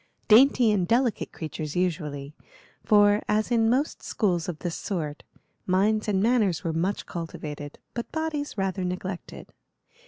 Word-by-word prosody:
Dainty 240 0 +6
and 190 -4 +1
delicate 235 0 +1
creatures 155 -2 -6
usually, 150 -6 -2 0.5
for, 205 0 +5
as 215 +3 +1
in 225 -1 +3
most 270 +6 0
schools 180 -6 0
of 170 - -4
this 175 +1 -4
sort, 160 -7 -4 0.5
minds 210 +4 +2
and 195 -2 +1
manners 220 -7 +2
were 165 - -1
much 180 +5 -1
cultivated, 150 -3 -6 0.2
but 235 - -5
bodies 310 -5 -3
rather 190 -1 -1
neglected. 180 0 -5
190 Hz, 135 wpm, -26 LUFS, 165-225 Hz, 0.5 s, Dainty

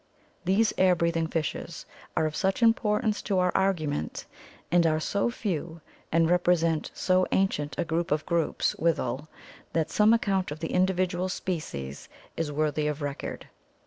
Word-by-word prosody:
These 205 +5 +3
air 185 -1 +5
breathing 170 -1 0
fishes 160 -2 -4 0.3
are 160 - +3
of 155 -1 -2
such 190 +5 0
importance 215 -1 +2
to 200 -3 -1
our 180 0 +3
argument, 155 - -1 0.5
and 170 -1 +4
are 155 -1 +2
so 200 +7 0
few, 170 - -3 0.3
and 165 0 +4
represent 170 -2 +2
so 185 0 +2
ancient 150 -7 0
a 175 - 0
group 165 0 -1
or 150 - +4
groups 165 +1 0
withal 150 -3 0 0.5
that 160 -2 0
some 210 +1 +5
account 195 -5 +1
of 150 - -5
the 165 - -4
individual 185 0 +1
species 70 - -5 0.3
is 160 -2 -2
worthy 150 0 0
of 150 0 -3
record. 140 -1 -5
170 Hz, 150 wpm, -27 LUFS, 155-190 Hz, 0.5 s, air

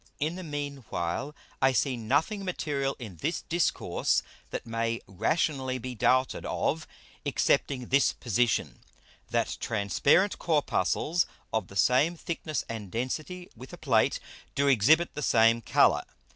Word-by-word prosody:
In 155 +4 -1
the 185 - -6
mean 145 -4 -4
while 85 - -3 0.3
I 135 0 +4
see 130 0 +1
nothing 145 - 0
material 145 -7 -2
in 105 -9 -9
this 160 - -2
Discourse 170 0 0 0.3
that - - -5
may 115 0 -1
rationally 130 - 0
be 125 0 -6
doubted 130 +3 +2
of, 160 +2 -1 0.4
excepting 125 -4 +1
this 140 +1 +4
Position: 120 -1 0 0.5
That - - 0
transparent 110 - +2
Corpuscles 155 - +1 0.3
of 110 -4 0
the 100 - -13
same 135 - +3
thickness 160 -2 -3
and 110 -4 -6
density 155 - -4
with 130 +8 -11
a - - -7
Plate, 120 -9 +2 0.4
do 140 +1 +2
exhibit 140 +7 +4
the 150 - -5
same 115 -3 +4
Colour. - - +4
135 Hz, 135 wpm, -28 LUFS, 115-155 Hz, 0.5 s, I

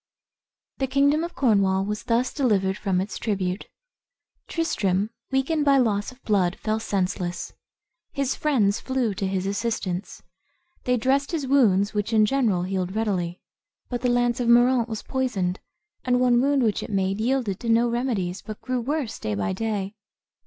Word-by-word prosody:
The 265 - 0
kingdom 285 +4 +3
of 345 0 -5
Cornwall 200 -7 +2
was 210 0 -3
thus 240 +2 +1
delivered 200 -9 +1
from 190 -2 -1
its 195 +3 -4
tribute. 195 -2 -2 0.8
Tristram, 205 - 0 0.2
weakened 275 +4 +1
by 280 -1 +5
loss 215 -3 +1
of 255 +1 -19
blood, 190 -4 +1
fell 215 0 -2
senseless. 180 -4 -2 0.6
His 275 -2 -1
friends 225 -10 +1
flew 260 -5 -1
to 195 0 -2
his 190 -1 -2
assistance. 200 -3 -3 0.6
They 250 0 +2
dressed 270 +4 +1
his 315 -5 -2
wounds, 215 -8 +3
which 210 +2 -2
in 215 -1 +5
general 215 -7 +1
healed 185 0 -2
readily; 185 -5 -1 0.5
but 245 -1 -3
the 250 - +1
lance 245 0 +1
of 245 - -1
Moraunt 240 0 +4
was 220 -2 -5
poisoned, 210 -9 -1 0.4
and 250 -1 +2
one 245 -1 +4
wound 280 0 +2
which 215 -3 +1
it - - -7
made 195 0 0
yielded 235 -5 0
to 235 - -4
no 230 +1 +4
remedies, 230 -7 -1
but 215 -1 -8
grew 255 -1 -2
worse 270 -3 -3
day 105 -1 -2
by 100 - -1
day. 200 -1 -2
225 Hz, 165 wpm, -24 LUFS, 195-255 Hz, 0.8 s, by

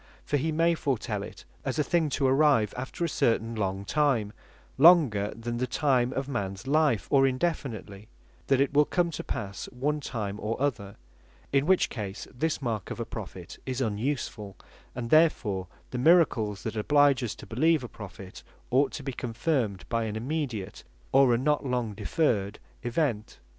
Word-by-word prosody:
For 145 - +1
he 160 +4 -1
may 165 +2 +3
foretel 140 -7 -2
it - - -9 0.2
as - - -2
a 150 - +3
thing 165 -1 +1
to 140 - +1
arrive 135 -6 +3
after 130 +7 -3
a - - 0
certain 115 -6 +1
long 100 -2 -2
time, 125 -7 +1 0.5
longer 140 - +6
then 120 +1 -4
the 125 +1 -1
time 130 -2 +1
of 135 0 -3
mans 100 -6 -4
life; 145 -5 +2
or 135 -1 +5
indefinitely, 125 - -3 0.4
that 135 -1 +3
it 140 +1 +1
will 150 +1 +5
come 175 +1 0
to - - -5
passe 100 -2 -5
one 145 +4 -1
time 105 -7 -4
or 110 +3 -3
other: 110 -8 -2 0.6
in 140 +2 +3
which 190 0 +3
case 100 -3 -5
this 155 +3 -2
mark 110 -5 -2
of - - -6
a - - -2
Prophet - - -8
is 130 0 -2
unusefull; 110 -3 -2 0.4
and 120 -1 -5
therefore 120 - +3 0.2
the 125 - -3
miracles 125 - +3
that 110 - -4
oblige 140 +3 +3
us 115 - -3
to - - -11
beleeve 155 +6 +2
a - - -5
Prophet, 95 -4 -10 0.3
ought 135 +3 +3
to 140 - -6
be 135 -1 -4
confirmed 120 - -2
by 115 -1 -1
an 105 -1 -4
immediate, 120 -5 -4 0.3
or 135 -1 +5
a 120 - +4
not 150 +4 +1
long 125 -5 -1
deferr'd 105 - 0 0.2
event. 120 -3 -1
125 Hz, 175 wpm, -28 LUFS, 105-145 Hz, 0.6 s, longer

